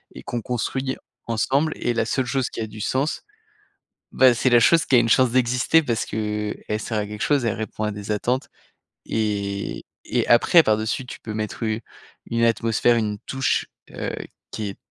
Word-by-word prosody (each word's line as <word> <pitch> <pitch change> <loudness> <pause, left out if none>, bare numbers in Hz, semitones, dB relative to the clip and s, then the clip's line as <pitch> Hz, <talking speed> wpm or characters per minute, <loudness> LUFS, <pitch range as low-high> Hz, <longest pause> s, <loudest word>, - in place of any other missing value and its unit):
et - - -9
qu'on 120 -1 -3
construit 130 +3 -2 0.3
ensemble» 135 +7 +1
et 120 - 0
la 115 -1 0
seule 130 +3 0
chose 130 0 -1
qui - - -6
a 110 - -3
du 105 0 -9
sens, 135 +8 -1 0.9
bah, 130 -2 +6
c'est 125 +2 +1
la 120 - +7
chose 165 +5 +5
qui 135 - +3
a 120 - +8
une 115 - +1
chance 130 0 +4
d'exister 125 +6 +3
parce 120 -5 -1
qu'elle 105 0 -3
sert 110 0 -3
à 105 - -1
quelque 105 0 -8
chose, 140 -4 +2
elle 115 - 0
répond 110 0 -5
à 105 - -1
des 105 +1 -6
attentes. 125 +6 -1 0.6
Et 100 -2 -2 0.2
et - - 0
après, 160 +8 +6
par 110 -5 +3
dessus, 110 +4 -2
tu - - -9
peux 110 - -6
mettre 110 +2 -4
une 110 0 -1 0.5
une 115 0 0
atmosphère, 115 +1 +2
une 105 -2 -1
touche, 135 +4 -1 0.2
heu, - - -4 0.4
qui 105 -2 -4
est 100 - -9
115 Hz, 195 wpm, -23 LUFS, 110-130 Hz, 0.9 s, a